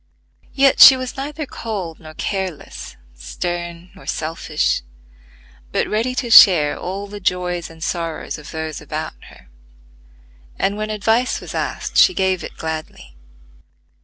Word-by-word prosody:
Yet, 275 -1 +4
she 265 - +11
was 255 -1 -5
neither 290 +3 -5
cold 200 - -6
nor 155 -1 -12
careless, 190 - -5 0.2
stern 175 - -5
nor 190 - -16
selfish, 155 -1 -1 0.9
but - - 0
ready 230 +4 -1
to 240 -2 -2
share 170 -9 +8
all 195 +3 -5
the 205 0 -9
joys 180 -2 -1
and 165 -1 -11
sorrows 165 -3 -3
of 150 - -11
those 160 -1 -5
about 155 +1 -5
her; - - -17 1.1
and 200 - 0
when 215 +1 -4
advice 225 +4 +1
was - - -9
asked - - -3
she 370 - +6
gave 190 -1 0
it - - -9
gladly. 155 - -6
180 Hz, 135 wpm, -20 LUFS, 160-215 Hz, 1.1 s, she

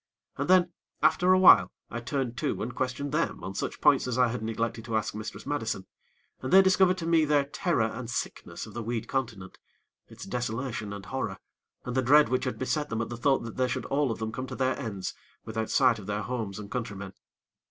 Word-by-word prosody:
And 140 +4 -3
then, 180 -1 +5 0.3
after 180 +1 +4
a 185 - +6
while, 185 - +7 0.2
I 120 - -3
turned 125 0 -2
to - - -1
and 125 +3 -4
questioned 130 +3 -2
them 160 +2 -1
on 95 - -5
such - - -4
points 140 -3 +4
as 125 -1 -2
I 125 -1 +4
had 120 -1 -4
neglected 115 +1 -2
to 110 -1 0
ask 110 - -2
Mistress 105 +1 -7
Madison, 115 -9 -2 0.6
and 130 - -4
they 190 +1 +8
discovered 190 -1 +4
to 170 - -4
me 165 -1 +4
their 145 -2 +3
terror 145 - 0
and 115 +2 -4
sickness 120 - -4
of - - -12
the 120 - -4
weed 115 0 -3
continent, 115 -8 -4 0.5
its - - -10
desolation 120 -3 -3
and 100 -1 -7
horror, 130 +5 -3 0.5
and 125 - -4
the 130 - +3
dread 145 +4 +5
which 130 +1 0
had 130 - -2
beset 150 +3 -1
them 115 - -2
at - - -7
the 120 - -4
thought 135 +3 +2
that 115 - -8
they 130 0 +2
should - - -3
all 140 0 +1
of 115 - -2
them 110 0 -3
come 130 +3 -5
to 130 - -6
their 130 0 +1
ends 105 -8 -4 0.3
without 110 0 -3
sight 125 -5 +4
of 100 - -10
their 105 0 -2
homes 115 -6 -4
and 105 -1 -8
countrymen. 100 -6 -5
125 Hz, 225 wpm, -28 LUFS, 110-140 Hz, 0.6 s, they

